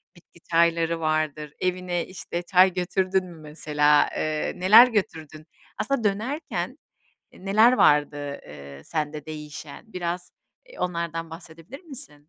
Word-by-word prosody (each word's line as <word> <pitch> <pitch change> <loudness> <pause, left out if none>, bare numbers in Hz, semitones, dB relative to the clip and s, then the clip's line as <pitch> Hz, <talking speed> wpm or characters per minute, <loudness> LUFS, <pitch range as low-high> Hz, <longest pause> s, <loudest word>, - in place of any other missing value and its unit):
bitki 170 0 -21
çayları 165 0 +2
vardır. 155 -1 -1
Evine, 180 -1 -1
işte, 175 -1 -6
çay 185 +1 +4
götürdün 185 +1 0
mü 170 -2 -12
mesela? 150 -1 +2
Eee, 155 -1 -2
neler 215 +7 +8
götürdün? 160 -8 -4 0.3
Aslında 275 -4 -1
dönerken, 225 +10 -2 0.6
eee, 185 - -16
neler 215 +5 +5
vardı, 150 - +4 0.3
eee, 70 -1 -11
sende 150 -1 -4
değişen? 150 - -9
Biraz, 175 0 -4 0.4
eee, - - -15
onlardan 170 -2 -3
bahsedebilir 165 - -11
misin? 275 - -5
170 Hz, 120 wpm, -25 LUFS, 155-190 Hz, 0.6 s, neler